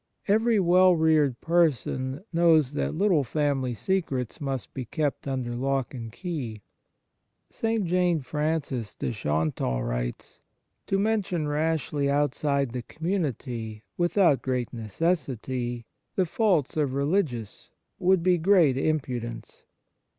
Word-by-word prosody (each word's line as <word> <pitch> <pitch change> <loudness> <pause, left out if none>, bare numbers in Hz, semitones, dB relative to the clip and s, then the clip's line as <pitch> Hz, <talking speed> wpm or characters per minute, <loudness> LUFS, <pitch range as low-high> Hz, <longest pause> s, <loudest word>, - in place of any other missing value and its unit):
Every 220 +2 +3
well 180 0 +5
reared 155 -6 +3
person 145 - +1
knows 160 -5 +4
that 150 - -1
little 180 -4 +3
family 135 -3 0
secrets 140 - -2
must 135 -4 -4
be 130 - -5
kept 145 +2 -2
under 130 -3 -2
lock 135 +1 -1
and 115 -3 -6
key. 125 - -5 0.9
St. 225 -3 -1
Jane 175 -2 +2
Frances 140 -6 -2
de - - -3
Chantal 75 - -1
writes: - - -4 0.2
" - - -51
To 195 - +1
mention 195 -6 0
rashly 150 -2 0
outside 140 -2 +1
the 125 +1 -4
community 125 - -3
with 175 +3 -1
out 160 - +5
great 125 -2 -2
necessity 120 - -2 0.3
the 190 - +2
faults 175 - +1
of 140 -4 0
religious 140 - -1 0.3
would 185 -1 +3
be 180 -1 +3
great 165 -7 +4
impudence. 125 -7 -3
145 Hz, 120 wpm, -26 LUFS, 125-175 Hz, 0.9 s, well